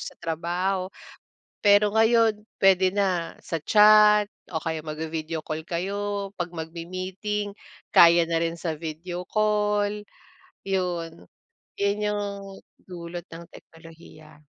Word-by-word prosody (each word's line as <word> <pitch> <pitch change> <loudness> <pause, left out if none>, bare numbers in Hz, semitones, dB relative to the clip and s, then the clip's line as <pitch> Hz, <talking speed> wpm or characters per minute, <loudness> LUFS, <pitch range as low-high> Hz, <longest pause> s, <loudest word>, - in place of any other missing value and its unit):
sa - - -8
trabaho. 175 +3 -2 0.7
Pero 205 0 +4
ngayon 225 -1 +3 0.2
puwede 190 -1 +4
na 185 -4 0
sa 165 - -3
chat 210 0 +6 0.2
o 170 - -6
kaya 160 -1 -2
magvi-video 160 +1 -5
call 155 0 -4
kayo. 200 +3 -3
'Pag 175 0 -4
magmi-meeting, 185 +5 -4 0.4
kaya 170 0 +7
na 165 0 -1
rin 165 0 -1
sa 165 -1 -3
video 175 +3 -6
call, 210 -1 0 0.6
'yon. 175 - -2 0.5
'Yon 200 0 0
'yong 210 0 -1 0.6
dulot 175 -1 -8
ng 165 +1 -10
teknolohiya. 160 -2 -16
180 Hz, 110 wpm, -25 LUFS, 165-205 Hz, 0.7 s, kaya